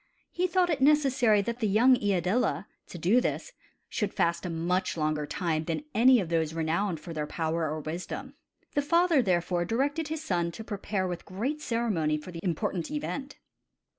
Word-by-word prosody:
He 365 +1 0
thought 360 -1 +2
it 285 -4 -1
necessary 265 -7 +4
that 235 +3 -4
the 220 - +1
young 235 +6 +5
Iadilla, 195 - 0 0.2
to - - -9
do 195 +10 +3
this, - - -2 0.4
should 210 -2 -2
fast 170 +2 +1
a - - -4
much 175 +3 -1
longer 155 -1 -1
time 160 -3 -1
than 165 - -2
any 250 +2 +6
of 180 -5 -3
those 160 -1 0
renowned 165 +2 0
for 165 - -8
their 150 -1 -3
power 160 0 -1
or 155 +1 -3
wisdom. 180 - -5 0.4
The 290 - +2
father 335 0 +3
therefore 175 -3 +1
directed 280 - -1
his 315 0 -4
son 175 - 0
to 220 - -7
prepare 200 -2 -2
with 175 -1 -5
great 250 +11 -3
ceremony 205 - 0
for 155 +4 -9
the 170 - -7
important 180 0 -2
event. 290 -2 -4
195 Hz, 180 wpm, -28 LUFS, 170-260 Hz, 0.4 s, any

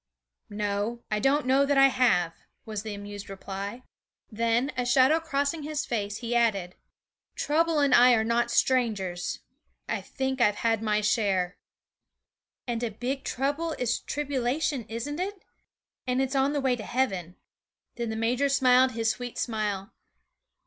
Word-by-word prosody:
'No, 205 +3 -2
I 210 - +1
don't 275 +5 +2
know 265 +2 +4
that 280 0 +1
I 270 0 +7
have,' 200 -11 +2 0.3
was 215 -2 -4
the 215 -1 -5
amused 205 0 -8
reply. 195 +4 -6 0.5
Then, 230 +5 +1
a 250 - 0
shadow 260 +6 +4
crossing 295 0 -1
his 305 +1 -3
face, 210 -3 -2
he 240 0 -3
added: 200 -7 +1 0.6
'Trouble 325 +2 +1
and 285 -3 +3
I 245 +1 +7
are 220 - +2
not 235 +1 +1
strangers. 215 -9 0 0.5
I - - -2
think 265 -1 -3
I - - +7
have 205 - -1
had 225 0 0
my 215 -1 +1
share.' 200 -4 0 1.1
'And 240 -2 -2
a 240 - -1
big 250 +6 -4
trouble 290 +5 -1
is 245 -4 -1
tribulation, 280 -2 -1
isn't 240 +8 -4
it? 390 +1 -4 0.6
And 250 0 +1
it's 265 +1 0
on 270 +2 +2
the 290 - 0
way 260 -2 +2
to 225 - -7
heaven.' 190 -10 -1 0.6
Then 235 -1 -4
the 220 - -3
major 245 +5 +1
smiled 260 -1 +4
his 225 -1 +1
sweet 245 0 -7
smile. 210 -3 -2
240 Hz, 155 wpm, -27 LUFS, 210-270 Hz, 1.1 s, I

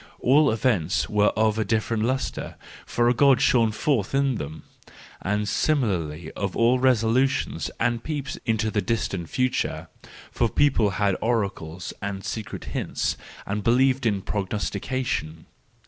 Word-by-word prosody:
All 145 +3 +4
events 100 -6 +1
were 105 0 +3
of 110 0 +2
a - - +2
different 110 +1 0
lustre, 130 +4 -2 0.3
for 120 0 +1
a 120 - +4
God 135 0 +5
shone 115 -4 +3
forth 115 0 0
in 135 -1 +2
them; 80 -1 -7 0.6
and 105 +2 -1
similarly 90 - 0
of 100 -2 -4
all 120 +2 +4
resolutions 130 +1 +1
and 120 -1 0
peeps 145 -3 -4
into 110 -1 0
the 105 - +1
distant 100 -5 -2
future: 130 0 -1 0.4
for 120 - +1
people 120 -5 +3
had 100 -2 +2
oracles, 95 -7 -2
and 100 -1 -4
secret 110 -3 -5
hints, - - -1 0.3
and 105 +1 -3
be¬ 115 +3 +4
lieved 130 -1 +3
in 100 -3 0
prognostication. 105 -2 -3
110 Hz, 140 wpm, -25 LUFS, 100-130 Hz, 0.6 s, God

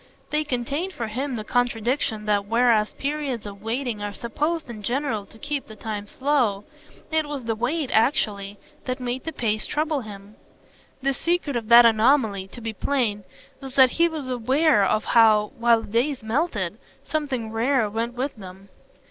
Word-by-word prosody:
They 305 0 +1
contained 285 +7 -2
for 235 - -4
him 260 +4 -3
the 215 - -4
contradiction 240 -1 0
that, 205 -1 +1
whereas 230 -1 +3
periods 280 -5 -3
of 200 -1 -9
waiting 230 0 -3
are 205 0 -4
supposed 300 - -2
in 225 -3 -8
general 235 -2 -2
to 225 - -17
keep 285 +3 -3
the 215 - -11
time 210 -1 -5
slow, 250 -7 0 0.5
it 315 -1 +1
was 290 -3 -5
the 225 0 -1
wait, 255 +6 -1
actually, 205 -4 +1 0.3
that 255 0 -3
made 250 +1 -4
the 320 - -3
pace 215 -6 -1
trouble 300 -1 0
him. 205 -1 -11 0.7
The 275 0 +2
secret 335 -1 -1
of 230 -2 -3
that 235 0 +9
anomaly, 220 -3 +3
to 240 - -11
be 225 -1 -4
plain, 215 -4 -1 0.4
was 270 -1 -8
that 260 -2 +7
he 340 0 +3
was 310 -5 -5
aware 255 +1 +3
of 215 +2 +1
how, 215 -2 +5
while 235 -1 +4
the 200 - -11
days 250 +3 0
melted, 220 - -1 0.2
something 275 -7 -3
rare 235 +1 +2
went 230 +3 -3
with 265 +3 -3
them. 190 0 -11
240 Hz, 175 wpm, -24 LUFS, 215-280 Hz, 0.7 s, that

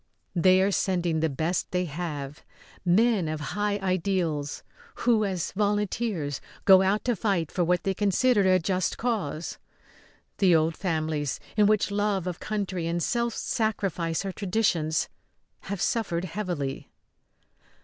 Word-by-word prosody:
They 185 +2 +5
are 200 - +2
sending 175 -4 0
the 160 0 +1
best 160 +6 -1
they 180 0 0
have 150 -3 -5 0.4
men 195 0 +3
of 155 0 -3
high 205 0 0
ideals, 175 -6 -1 0.4
who, 230 -3 +4
as 185 -4 -2
volunteers, 205 - -1 0.2
go 190 -1 +8
out 195 +2 +1
to 245 -1 +2
fight 185 -6 0
for 180 - 0
what 180 +1 +1
they 195 - 0
consider 205 +4 +2
a 185 - +6
just 185 0 -1
cause. 195 -10 -2 0.8
The 185 -4 +5
old 160 +1 +2
families, 155 -5 -2 0.2
in 210 -1 +5
which 210 -1 +2
love 200 -3 0
of 180 -2 -4
country 195 -5 -3
and 170 0 -1
self 235 -1 0
sacrifice 195 -7 -1
are 195 - -2
traditions, 180 -6 0 0.6
have 200 -1 -4
suffered 195 -8 0
heavily. 170 -7 -4
185 Hz, 140 wpm, -27 LUFS, 165-205 Hz, 0.8 s, go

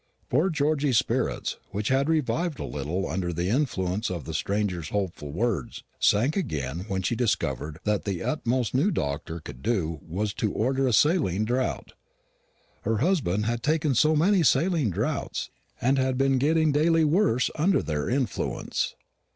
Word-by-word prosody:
Poor 155 +9 +2
Georgy's 145 -5 +1
spirits, - - -1
which 105 +2 -2
had 135 +3 +2
revived 160 +1 0
a - - -4
little 80 +7 -3
under 90 +1 -2
the 85 +2 -2
influence 105 -6 0
of 85 -4 -4
the - - -5
stranger's 95 -6 -1
hopeful 90 -8 -3
words, 95 - -2 0.2
sank 120 +9 +3
again 75 - -3
when 95 -2 -2
she 120 - 0
discovered 75 - -1
that 105 -1 0
the 95 -4 -3
utmost 125 -5 0
the 130 - +1
new 190 - +3
doctor 80 - -3
could 65 -4 -10
do 85 - -1
was 100 +5 -3
to 105 -1 -1
order 130 +4 +1
a - - +2
saline 110 - +3
draught. 125 +3 -2 0.9
Her 115 -1 0
husband 120 - +1
had 120 +1 -1
taken 155 0 +1
so 155 +6 +4
many 185 +5 +4
saline 160 - +3
draughts, 90 - -2 0.3
and 135 +3 +2
had 130 -1 +1
been 135 -1 +2
getting 155 +2 +3
daily 160 +3 +3
worse 150 - +2
under 185 +5 +2
their 75 -2 -2
influence. 130 -4 -1
120 Hz, 160 wpm, -26 LUFS, 90-150 Hz, 0.9 s, so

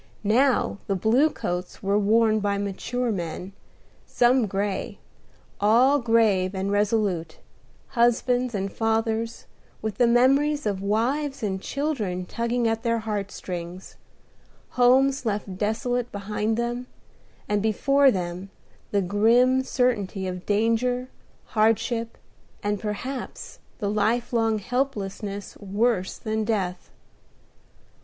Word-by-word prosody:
Now 240 0 +2
the 195 - 0
blue 235 - +3
coats 180 -10 -5
were 200 +1 +2
worn 220 +1 +3
by 200 -1 0
mature 225 +5 -2
men, 180 0 -5 0.5
some 245 -1 +3
gray, 195 0 -2 0.6
all 245 +7 +4
grave 220 -6 +2
and 190 +1 -2
resolute: 205 -6 0 0.5
husbands 245 0 +2
and 195 0 -3
fathers, 225 0 -1 0.3
with 215 -2 -4
the 245 - +5
memory 275 +5 +4
of 200 -3 -1
wives 255 +7 -1
and 190 -2 -2
children 220 -13 -2
tugging 235 +3 -1
at 225 0 0
their 230 -1 +1
heart 210 -3 -3
strings; 180 -1 -7 0.7
homes 260 +2 +3
left 205 -4 -3
desolate 245 +3 -1
behind 210 +2 -2
them, 240 +1 -2 0.6
and 205 -1 +1
before 275 +6 +3
them 180 -2 -3 0.4
the 200 -1 +1
grim 235 +7 +4
certainty 215 -7 0
of 180 -1 -5
danger, 230 +4 +1 0.4
hardship, 225 +1 +1 0.5
and 205 0 -1
perhaps 240 +6 -5 0.2
the 205 - -2
lifelong 225 +1 +1
helplessness 205 -4 -3
worse 205 0 0
than 220 0 -2
death. 195 -5 -2
220 Hz, 110 wpm, -25 LUFS, 200-245 Hz, 0.7 s, the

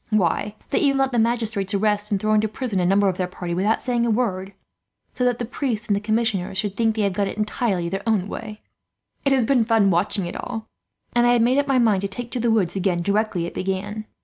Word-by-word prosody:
Why, 205 0 +1 0.2
they - - +2
even 275 -2 +2
let 270 0 +1
the 240 - +1
magistrates 220 -4 0
arrest 210 0 +1
and 200 -3 0
throw 215 +2 +1
into 215 0 +3
prison 215 -2 -3
a 175 - +2
number 200 +2 +3
of 185 -2 0
their 185 - -1
party, 180 -1 -5
without 200 +6 +1
saying 240 -2 0
a 235 - +1
word, 200 -4 -1 0.6
so 250 - -2
that 245 -1 +2
the 240 - -3
priests 235 -3 -3
and 205 - +1
the - - 0
commissioners 215 -3 -1
should 200 -1 -2
think 225 0 +1
they 215 - 0
have 200 -2 +1
got 200 +1 0
it - - -6
entirely 210 -4 -1
their 195 +3 -3
own 205 -4 +1
way. 210 0 -7 0.6
It 275 - +3
has 260 -3 +3
been 250 -1 +3
fun 220 -3 +3
watching 190 +2 +1
it 175 - -6
all, 225 -3 -5 0.5
and 240 0 +4
I 240 - +5
had 235 -1 +3
made 255 +4 +3
up 285 - 0
my 270 -2 +2
mind 220 -6 +3
to 200 - -1
take 235 +5 -6
to 250 - -2
the 235 0 +1
woods 200 -6 +1
again, 180 -3 0
directly 200 -3 0
it - - -6
began. 200 +3 -3
215 Hz, 255 wpm, -23 LUFS, 195-235 Hz, 0.6 s, I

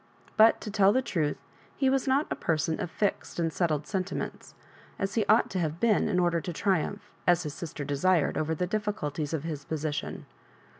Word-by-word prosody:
But, 220 +1 +6
to 210 - -5
tell 200 -1 +5
the 260 +4 +2
truth, 160 -11 -1 0.4
he 270 - +2
was 270 0 +2
not 275 +3 +3
a - - 0
person 160 0 0
of - - -3
fixed 200 +4 -2
and 165 -2 0
settled 155 -4 0
sentiments, 185 +3 -4 0.4
as 195 0 -2
he 225 - +1
ought 215 +3 +4
to 190 - -1
have 160 -1 -2
been 220 -2 +3
in 180 -3 +2
order 175 -1 +2
to 175 - -4
triumph, 190 +3 -1 0.2
as 175 -1 +4
his 150 -2 -5
sister 150 -3 -6
desired, 145 +3 +2
over 160 +1 0
the 180 - -1
difficulties 180 -7 -2
of 160 -3 -2
his 155 -4 -4
position. 150 -1 -3
175 Hz, 195 wpm, -28 LUFS, 155-205 Hz, 0.4 s, But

